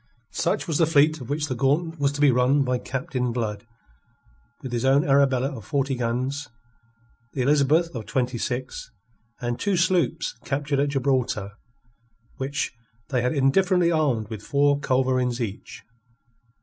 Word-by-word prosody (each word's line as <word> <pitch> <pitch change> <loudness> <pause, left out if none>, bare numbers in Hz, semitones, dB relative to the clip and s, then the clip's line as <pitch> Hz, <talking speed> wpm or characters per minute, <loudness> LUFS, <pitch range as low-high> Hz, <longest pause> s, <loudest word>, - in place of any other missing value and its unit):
Such - - -1
was 160 -3 0
the 165 - +4
fleet 155 -1 +3
of 120 - -9
which 150 +1 -1
the 140 - -3
gauntlet 150 +6 0
was 140 -1 +2
to 145 - -4
be 145 -2 +6
run 125 +3 +3
by 125 -1 0
Captain 130 -2 -3
Blood 110 -2 -3 1.0
with 130 - -5
his 120 -1 -2
own 135 +2 +3
Arabella 135 -1 +2
of 110 - -9
forty 140 0 -1
guns, 130 +4 -2 0.9
the 130 - -1
Elizabeth 150 +5 +3
of 115 -4 -6
twenty 125 -2 -1
six, 130 0 -4 0.5
and 120 0 -2
two 200 -2 0
sloops 170 -2 +1
captured 140 0 -1
at 145 +1 +2
Gibraltar, 130 -7 0 0.9
which 135 +1 -2 0.4
they 125 -3 +1
had 125 +5 0
indifferently 175 +5 +3
armed 140 -10 +1
with 110 -2 -5
four 145 +3 +2
culverins 130 -3 +1
each. 110 -3 -6
135 Hz, 150 wpm, -24 LUFS, 125-145 Hz, 1.0 s, be